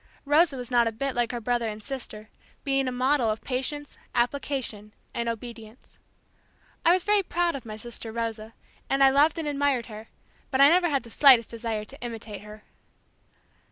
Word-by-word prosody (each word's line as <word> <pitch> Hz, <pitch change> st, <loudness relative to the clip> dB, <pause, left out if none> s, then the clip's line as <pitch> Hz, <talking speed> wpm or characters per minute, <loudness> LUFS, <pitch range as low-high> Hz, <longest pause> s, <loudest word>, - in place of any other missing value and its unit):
Rosa 295 Hz, 0 st, +3 dB
was 250 Hz, 0 st, -7 dB
not 240 Hz, -1 st, +4 dB
a -, -, 0 dB
bit 270 Hz, +4 st, -3 dB
like 240 Hz, -1 st, 0 dB
her 240 Hz, -, -3 dB
brother 235 Hz, 0 st, -1 dB
and 215 Hz, 0 st, -8 dB
sister; 230 Hz, -5 st, -7 dB, 0.3 s
being 270 Hz, -1 st, +1 dB
a -, -, -1 dB
model 255 Hz, -1 st, +1 dB
of 215 Hz, 0 st, -3 dB
patience, 280 Hz, +3 st, -4 dB, 0.2 s
application 240 Hz, -4 st, -2 dB, 0.2 s
and 235 Hz, 0 st, -2 dB
obedience. 230 Hz, 0 st, -9 dB, 0.8 s
I 335 Hz, -, +6 dB
was 365 Hz, 0 st, +3 dB
very 415 Hz, -1 st, +3 dB
proud 350 Hz, -2 st, 0 dB
of 255 Hz, -4 st, -8 dB
my 215 Hz, 0 st, -6 dB
sister 230 Hz, 0 st, -6 dB
Rosa, 225 Hz, -1 st, -4 dB, 0.3 s
and 275 Hz, 0 st, +3 dB
I 270 Hz, -, +7 dB
loved 295 Hz, +4 st, +4 dB
and 320 Hz, -2 st, -3 dB
admired 280 Hz, -4 st, +1 dB
her, 215 Hz, 0 st, -10 dB, 0.4 s
but 265 Hz, -, -1 dB
I 280 Hz, +1 st, +8 dB
never 350 Hz, +1 st, +4 dB
had 275 Hz, -4 st, 0 dB
the 230 Hz, -, -13 dB
slightest 255 Hz, -5 st, +6 dB
desire 225 Hz, -2 st, -3 dB
to 275 Hz, +6 st, -11 dB
imitate 225 Hz, -4 st, -7 dB
her. 210 Hz, 0 st, -12 dB
245 Hz, 185 wpm, -26 LUFS, 225-280 Hz, 0.8 s, I